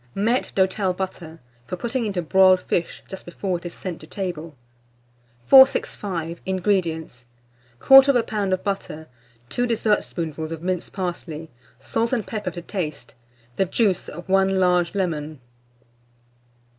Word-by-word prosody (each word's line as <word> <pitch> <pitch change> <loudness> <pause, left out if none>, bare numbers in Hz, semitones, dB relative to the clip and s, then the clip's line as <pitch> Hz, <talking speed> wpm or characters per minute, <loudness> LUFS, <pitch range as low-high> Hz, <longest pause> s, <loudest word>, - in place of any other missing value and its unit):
MAITRE 230 +6 0
D'HOTEL 190 0 +1
BUTTER, 180 -3 -6 0.3
for - - -3
putting 235 +4 -2
into 190 -4 -2
Broiled 185 +2 +5
Fish 170 - -2
just 190 - -9
before 180 0 -3
it 175 - -7
is 170 - -8
sent 180 -3 -6
to 155 - -12
Table. 170 -5 -5 0.9
465. 185 - +4
INGREDIENTS. 175 -9 -1 0.6
1/4 270 0 +9 0.2
lb. 205 -4 -2
of 185 - 0
butter, 195 -6 -4 0.4
2 245 0 0
dessertspoonfuls 170 -8 -1
of 165 0 -6
minced 180 -1 -2
parsley, 170 -4 -5 0.3
salt 230 - -2
and 230 -5 0
pepper 215 -2 -4
to 175 - -8
taste, 155 - -5 0.4
the 195 - +2
juice 190 -1 0
of 175 +4 -9
1 195 0 +2
large 180 0 +2
lemon. 155 -6 -2
185 Hz, 130 wpm, -23 LUFS, 165-200 Hz, 0.9 s, 1/4